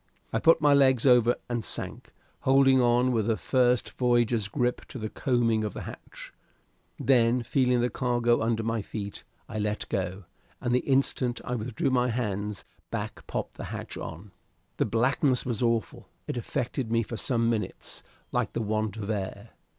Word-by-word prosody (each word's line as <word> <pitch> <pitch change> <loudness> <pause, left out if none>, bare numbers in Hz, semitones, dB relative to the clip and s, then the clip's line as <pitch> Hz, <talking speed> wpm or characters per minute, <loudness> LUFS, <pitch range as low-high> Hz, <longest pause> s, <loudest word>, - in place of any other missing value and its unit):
I 115 - +2
put 165 +5 +5
my 145 -1 +5
legs 130 -3 +4
over 125 -2 +5
and 120 -2 -2
sank, - - -3 0.3
holding 135 -1 +5
on 125 +1 +3
with 115 -2 +1
a 110 - +2
first 125 -2 +2
voyager's 120 -4 +2
grip 125 +1 -1
to - - -9
the 110 -2 -5
coaming 115 -4 +1
of 105 - -4
the - - -5
hatch; - - -10 0.6
then, 120 -2 +3
feeling 125 0 +2
the 120 - 0
cargo 120 -2 +1
under 115 0 0
my 115 0 -1
feet, 100 0 -6 0.2
I 110 - -4
let 105 0 -2
go, 95 +1 -2 0.4
and 120 - -1
the 125 - +4
instant 130 -2 +1
I 125 - -3
withdrew 120 +2 -1
my 125 -1 +2
hands, 105 -3 -3 0.2
Back - - -5
popped - - -4
the - - -5
hatch - - -6
on. 90 +5 -8 0.5
The - - +2
blackness 125 +2 +1
was 120 -3 -2
awful. 115 -2 -1 0.2
It - - -4
affected 125 -1 -3
me 115 0 +2
for 115 - -6
some 115 0 +1
minutes 115 -2 -3 0.3
like - - -1
the 115 - -1
want 110 0 -1
of 100 -2 -5
air. 100 +1 -4
120 Hz, 175 wpm, -28 LUFS, 110-125 Hz, 0.6 s, put